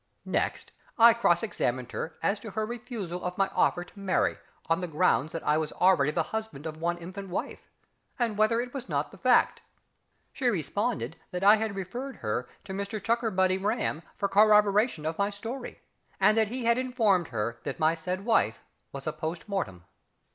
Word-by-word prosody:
Next - - -1 0.3
I 235 0 +8
cross 175 -7 +3
questioned 125 - -2
her 160 - -5
as 200 +1 +1
to 220 - -8
her 215 +2 -2
refusal 215 -6 -5
of 180 0 -3
my 195 -1 +2
offer 175 -2 +1
to 190 - -16
marry 195 -2 +1 0.3
on 165 +2 +1
the 180 - -2
ground 155 -4 +2
that 165 - -5
I 150 - +2
was 155 -1 -2
already 180 -6 +4
the 150 - 0
husband 220 -10 -4
of 155 -1 -5
one 170 +2 -1
infant 185 +3 -8
wife, 180 - -5 0.5
and 235 -4 0
whether 215 +2 +3
it 245 0 -4
was 265 -2 -6
not - - -1
the - - -14
fact. - - +3 0.7
She 260 - -1
responded 205 +4 -2
that 180 +1 -4
I 205 +2 +8
had 215 -2 -2
referred 240 +9 -5
her 115 +3 -3
to 195 - -7
Mr 200 +2 -3
CHUCKERBUTTY 200 -4 +1
RAM 205 -6 -1 0.2
for 200 - 0
corroboration 210 -2 +4
of 160 +3 -3
my 200 0 +2
story, 230 +5 -7 0.4
and 200 +2 +5
that 220 -1 +3
he 245 +2 -4
had 235 +1 +4
informed 225 - +2
her 115 0 -3
that - - -4
my 155 +1 +3
said 180 +4 -4
wife 225 - +2 0.3
was 140 -1 -7
a 155 - -1
post 160 +3 -5
mortem. 95 - -3
195 Hz, 190 wpm, -28 LUFS, 165-220 Hz, 0.7 s, I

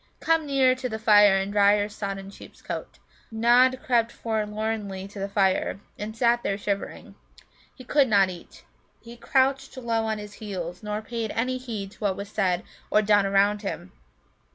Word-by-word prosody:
Come 325 -2 +1
nearer 265 -2 +4
to 255 0 -4
the 220 - -4
fire, 210 -3 +6
and 195 +1 -2
dry 205 0 +5
your 205 0 0
sodden 195 -2 -6
sheep's - - -15
coat." - - -6 0.3
Nod 245 +3 +3
crept 235 -2 +2
forlornly 215 -3 -3
to 200 0 -11
the 195 +1 -3
fire, 195 -1 +1 0.2
and 220 +2 -7
sat 235 0 +3
there 200 - -1
shivering. 200 -1 -4 0.6
He 255 - -12
could 280 +2 +3
not 200 -4 +3
eat. 175 -1 -13 0.4
He 235 0 -11
crouched 265 +2 0
low 230 -3 -1
on 220 -1 -1
his 210 -1 -9
heels, 180 -4 -5
nor 210 0 -4
paid 230 -1 -4
any 255 +2 -1
heed 215 -6 -6
to - - -19
what 200 -3 -1
was 200 0 -6
said 180 -2 0 0.3
or 215 - +3
done 205 -1 +3
around 200 +1 +2
him. 195 - -6
210 Hz, 175 wpm, -25 LUFS, 200-235 Hz, 0.6 s, fire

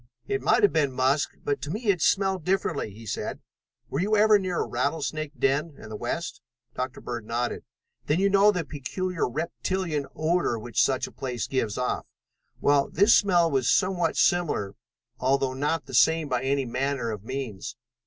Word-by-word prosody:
"It 135 - -1
might - - +3
have 205 - +5
been 150 -4 +2
musk, 135 +3 +1
but 145 - -1
to 145 - -5
me 215 +6 -2
it 180 -4 -3
smelled 190 0 +2
differently," 165 - 0
he 110 +3 -12
said. - - -4 0.5
"Were - - -3
you 210 +4 +2
ever 210 0 +6
near 185 -3 -1
a - - -6
rattlesnake 150 +3 -2
den 140 +5 +1
in 110 - -11
the 110 - -6
west?" 120 +10 -4 0.3
Dr. 130 0 -4
Bird 120 -2 -5
nodded. 120 +2 -3 0.4
"Then 150 +4 +2
you 195 - +4
know 200 +1 +5
the 180 -4 -2
peculiar 165 +3 -3
reptilian 160 +1 -2
odor 160 -6 +1
which 115 0 -1
such 130 -1 +1
a - - -10
place 125 -3 -4
gives 115 -6 -1
off. 125 0 -2 0.5
Well, 140 -1 +3
this 205 +4 +5
smell 175 -4 +4
was 130 -3 +1
somewhat 185 -2 +2
similar, 165 - +1 0.5
although 135 0 +1
not 145 +4 -1
the - - -11
same 155 +6 +4
by 125 -3 0
any 135 0 +1
manner 125 -1 -1
of 105 -2 -6
means. 120 -3 -5
145 Hz, 180 wpm, -26 LUFS, 125-175 Hz, 0.5 s, ever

